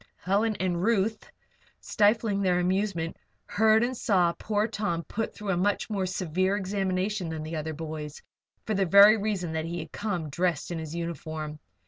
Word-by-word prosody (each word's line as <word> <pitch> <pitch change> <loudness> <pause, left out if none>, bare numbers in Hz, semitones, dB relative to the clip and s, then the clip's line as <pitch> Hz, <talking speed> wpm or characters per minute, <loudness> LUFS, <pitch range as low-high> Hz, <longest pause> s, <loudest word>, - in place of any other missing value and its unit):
Helen 210 +4 +1
and 180 -2 0
Ruth, 220 0 0 0.5
stifling 210 -1 +2
their 180 -2 +2
amusement, 180 -2 -1 0.3
heard 220 +1 +3
and 255 +2 -1
saw 180 -7 +2
poor 210 0 0
Tom 205 -7 -2
put 225 +8 -3
through 210 -1 -6
a 180 - 0
much 205 +4 0
more 195 -3 -1
severe 185 +1 0
examination 190 -1 -1
than 160 -1 -4
the 160 +1 -5
other 155 0 -4
boys, 155 -1 -6 0.5
for 220 - -1
the 195 -2 +1
very 200 +4 +8
reason 200 -6 -2
that 160 0 -2
he 170 +1 -4
had 160 -2 -7
come 180 -8 -3
dressed 175 0 -1
in 170 - -3
his 160 0 -6
uniform. 155 -2 -5
185 Hz, 170 wpm, -27 LUFS, 165-205 Hz, 0.5 s, very